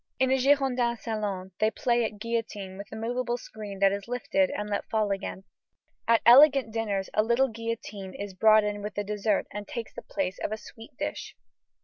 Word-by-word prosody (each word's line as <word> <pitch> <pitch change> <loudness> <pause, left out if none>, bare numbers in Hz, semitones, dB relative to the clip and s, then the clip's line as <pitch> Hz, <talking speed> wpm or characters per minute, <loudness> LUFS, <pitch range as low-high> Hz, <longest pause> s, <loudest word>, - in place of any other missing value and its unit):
In 260 0 +2
a 265 - +3
Girondin 255 -3 +2
salon 205 -5 -4
they 215 - +4
play 240 +1 +1
at 215 -1 -3
guillotine 215 -4 -4
with 200 +1 -9
a - - -6
moveable 240 +2 -2
screen 210 -4 -8
that 195 0 +6
is 200 +1 -4
lifted 235 -6 +1
and 210 - -4
let 205 -1 -3
fall 215 -2 +1
again. 195 -1 -4 0.6
At 230 -1 +4
elegant 270 -1 +7
dinners 205 -4 -2
a 215 - +4
little 235 +4 +2
guillotine 220 -4 -6
is 200 -1 -6
brought 215 +3 +5
in 210 0 -2
with 210 0 -6
the 205 - -1
dessert 210 0 0
and 205 0 -6
takes 235 -2 -6
the - - -7
place 190 -2 -3
of - - -1
a 215 - -2
sweet 225 +3 -13
dish. - - -4
215 Hz, 200 wpm, -28 LUFS, 200-235 Hz, 0.6 s, elegant